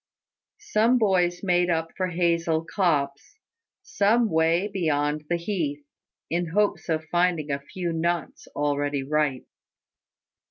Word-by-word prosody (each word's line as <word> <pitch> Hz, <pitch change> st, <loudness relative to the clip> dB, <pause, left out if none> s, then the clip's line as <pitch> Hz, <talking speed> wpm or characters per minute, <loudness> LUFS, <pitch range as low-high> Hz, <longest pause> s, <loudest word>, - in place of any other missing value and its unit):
Some 230 Hz, +4 st, +2 dB
boys 180 Hz, -5 st, +1 dB
made 180 Hz, -2 st, +2 dB, 0.3 s
for 185 Hz, -, -1 dB
a -, -, -6 dB
hazel 170 Hz, -2 st, +1 dB
copse, 145 Hz, -, -1 dB, 0.5 s
some 220 Hz, +2 st, +2 dB
way 165 Hz, +4 st, +2 dB
beyond 150 Hz, -6 st, -1 dB
the 175 Hz, -, +2 dB
heath, 165 Hz, -6 st, -3 dB, 0.4 s
in 175 Hz, +1 st, -1 dB
hopes 205 Hz, +2 st, 0 dB
of 160 Hz, -1 st, -1 dB
finding 175 Hz, -4 st, +1 dB
a 140 Hz, -, -1 dB
few 170 Hz, +4 st, -4 dB
nuts 170 Hz, -1 st, -2 dB
already 145 Hz, -1 st, -1 dB
ripe. 145 Hz, -2 st, 0 dB
170 Hz, 120 wpm, -25 LUFS, 150-180 Hz, 0.5 s, Some